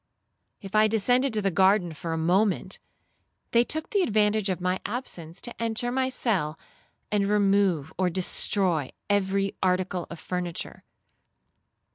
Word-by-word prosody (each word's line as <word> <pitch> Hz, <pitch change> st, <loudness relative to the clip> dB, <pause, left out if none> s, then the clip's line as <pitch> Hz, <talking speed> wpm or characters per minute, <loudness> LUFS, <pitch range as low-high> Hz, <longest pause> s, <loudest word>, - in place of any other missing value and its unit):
If 195 Hz, -2 st, -9 dB
I 215 Hz, 0 st, +5 dB
descended 245 Hz, +5 st, +2 dB
to 210 Hz, -, 0 dB
the 195 Hz, -, +1 dB
garden 190 Hz, 0 st, +3 dB
for 165 Hz, +2 st, -6 dB
a 165 Hz, -, -1 dB
moment, 185 Hz, +3 st, +1 dB, 0.7 s
they 235 Hz, 0 st, +5 dB
took 315 Hz, +5 st, -3 dB
the 405 Hz, -, +2 dB
advantage 215 Hz, -, +2 dB
of 185 Hz, -, -1 dB
my 185 Hz, +1 st, -1 dB
absence 190 Hz, -8 st, -5 dB
to 240 Hz, -, -9 dB
enter 230 Hz, +1 st, -1 dB
my 260 Hz, +1 st, 0 dB
cell, 185 Hz, -12 st, -1 dB, 0.5 s
and 205 Hz, -1 st, +1 dB
remove 195 Hz, -7 st, +2 dB
or 185 Hz, -1 st, +2 dB
destroy 180 Hz, -3 st, +1 dB, 0.2 s
every 195 Hz, 0 st, +1 dB
article 185 Hz, -1 st, 0 dB
of 170 Hz, -, -8 dB
furniture. 180 Hz, -2 st, -5 dB
195 Hz, 140 wpm, -26 LUFS, 180-215 Hz, 0.7 s, I